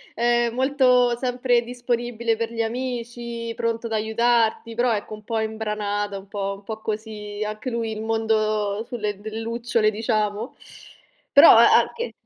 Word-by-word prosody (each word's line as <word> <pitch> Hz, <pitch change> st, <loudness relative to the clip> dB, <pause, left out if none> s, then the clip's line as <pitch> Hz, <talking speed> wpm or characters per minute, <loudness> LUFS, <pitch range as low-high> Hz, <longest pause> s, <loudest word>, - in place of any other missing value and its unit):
ehm, 240 Hz, 0 st, +2 dB
molto 250 Hz, -2 st, +3 dB
sempre 245 Hz, -1 st, +1 dB
disponibile 240 Hz, -1 st, -2 dB
per 230 Hz, 0 st, -3 dB
gli 230 Hz, -1 st, -2 dB
amici, 235 Hz, -1 st, -4 dB
pronto 230 Hz, 0 st, -2 dB
ad 225 Hz, -, -5 dB
aiutarti, 230 Hz, +1 st, +1 dB
però 240 Hz, 0 st, +2 dB
ecco 210 Hz, +1 st, -4 dB
un 215 Hz, -, -9 dB
po' 225 Hz, +1 st, -2 dB
imbranata, 210 Hz, -2 st, -2 dB
un 195 Hz, 0 st, -11 dB
po 200 Hz, 0 st, -3 dB
un 200 Hz, -, -16 dB
po' 220 Hz, 0 st, -6 dB
così, 215 Hz, -1 st, -5 dB
anche 215 Hz, +4 st, -5 dB
lui 230 Hz, -2 st, -2 dB
il 215 Hz, -, -6 dB
mondo 215 Hz, -2 st, 0 dB
sulle 210 Hz, -4 st, -3 dB
bri 215 Hz, +2 st, -7 dB
lucciole, 230 Hz, -1 st, 0 dB
diciamo. 215 Hz, +1 st, -2 dB, 0.8 s
Però -, -, +9 dB
a -, -, +7 dB
anche 470 Hz, +1 st, -3 dB
225 Hz, 150 wpm, -23 LUFS, 215-240 Hz, 0.8 s, Però